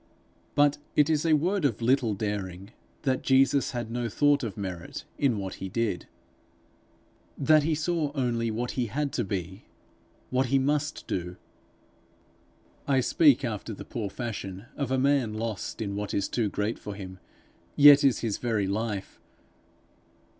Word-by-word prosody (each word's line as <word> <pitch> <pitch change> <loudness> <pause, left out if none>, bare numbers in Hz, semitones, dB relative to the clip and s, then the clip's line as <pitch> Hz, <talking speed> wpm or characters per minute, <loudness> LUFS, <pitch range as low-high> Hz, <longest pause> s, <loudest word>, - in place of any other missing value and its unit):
But 145 0 +4 0.2
it 150 +1 +4
is 155 +1 +1
a 160 - +4
word 180 +5 0
of 130 -7 +1
little 120 -2 +2
daring, 100 -1 -4 0.3
that 130 -3 +1
Jesus 135 +1 +3
had 120 -3 -4
no 120 0 -2
thought 145 +5 +3
of 110 -6 -5
merit 90 -4 -6
in 130 -6 +2
what 95 -2 -4
he 95 - -4
did 105 -4 -2 1.3
that 155 +2 +5
he 155 +1 0
saw 160 -1 -1
only 120 -4 0
what 120 +3 -2
he 125 -2 -1
had 140 +5 -2
to 120 - 0
be, 95 0 -5 0.7
what 130 +1 +2
he 135 - +3
must 150 +3 -1
do. 90 0 -3 1.5
I 135 -2 +3
speak 135 0 +4
after 110 -1 -4
the - - -9
poor 110 -4 -4
fashion 100 -3 -6
of 140 -3 -2
a 130 - +1
man 130 -5 +2
lost 110 0 -4
in 100 -1 -4
what 105 0 -3
is 100 - 0
too 115 -4 0
great 105 +3 -2
for 105 - -7
him, 95 -2 -9 0.6
yet 145 0 +8
is 135 -3 +3
his 110 -4 -2
very 110 -5 0
life. 100 0 -3
120 Hz, 160 wpm, -27 LUFS, 105-140 Hz, 1.5 s, yet